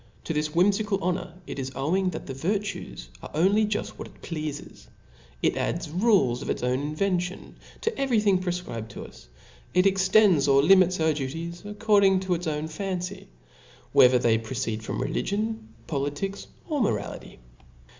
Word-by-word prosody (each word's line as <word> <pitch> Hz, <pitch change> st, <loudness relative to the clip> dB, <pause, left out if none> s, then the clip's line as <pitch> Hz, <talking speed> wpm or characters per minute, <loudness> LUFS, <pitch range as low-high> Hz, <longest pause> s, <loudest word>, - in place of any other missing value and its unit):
To -, -, -3 dB
this 150 Hz, 0 st, 0 dB
whimfical 200 Hz, +3 st, +3 dB
honor 175 Hz, -1 st, -2 dB
it -, -, -6 dB
is 130 Hz, 0 st, -4 dB
owing 180 Hz, +8 st, +1 dB
that 165 Hz, -, -6 dB
the 135 Hz, -, -6 dB
vir 170 Hz, +11 st, 0 dB
tues 65 Hz, -, -7 dB
are -, -, -8 dB
only 200 Hz, +6 st, +3 dB
juft 210 Hz, 0 st, -2 dB
what -, -, -6 dB
it -, -, -20 dB
pleafes; 155 Hz, -3 st, -6 dB, 0.6 s
it -, -, +2 dB
adds 165 Hz, -2 st, -2 dB
rules 180 Hz, -, +3 dB
a( -, -, -6 dB
its -, -, -2 dB
own 125 Hz, +1 st, +1 dB
invention 180 Hz, +5 st, -2 dB, 0.3 s
to 450 Hz, 0 st, -1 dB
every 265 Hz, -5 st, +2 dB
thing 200 Hz, -3 st, +3 dB
prefcribed 175 Hz, -11 st, -4 dB
to -, -, -8 dB
us 65 Hz, 0 st, -15 dB
i -, -, -14 dB
it 180 Hz, -, +5 dB
extends 190 Hz, -5 st, +4 dB
or 140 Hz, 0 st, +5 dB
limits 185 Hz, +1 st, +5 dB
our 160 Hz, -1 st, +3 dB
duties 165 Hz, +5 st, -5 dB
according 205 Hz, -2 st, +3 dB
to 190 Hz, -1 st, 0 dB
its 175 Hz, 0 st, -3 dB
own 150 Hz, 0 st, -2 dB
fancy, 185 Hz, +3 st, -4 dB, 0.7 s
whether 125 Hz, 0 st, +7 dB
they 115 Hz, -2 st, +3 dB
proceed 110 Hz, -1 st, -3 dB
from 110 Hz, -, -4 dB
religion, 215 Hz, +9 st, -2 dB, 0.2 s
poli 140 Hz, -2 st, -1 dB
tics, 195 Hz, +7 st, -5 dB, 0.2 s
or 300 Hz, -5 st, -1 dB
morality. 105 Hz, -, -2 dB
175 Hz, 170 wpm, -26 LUFS, 140-195 Hz, 0.7 s, whether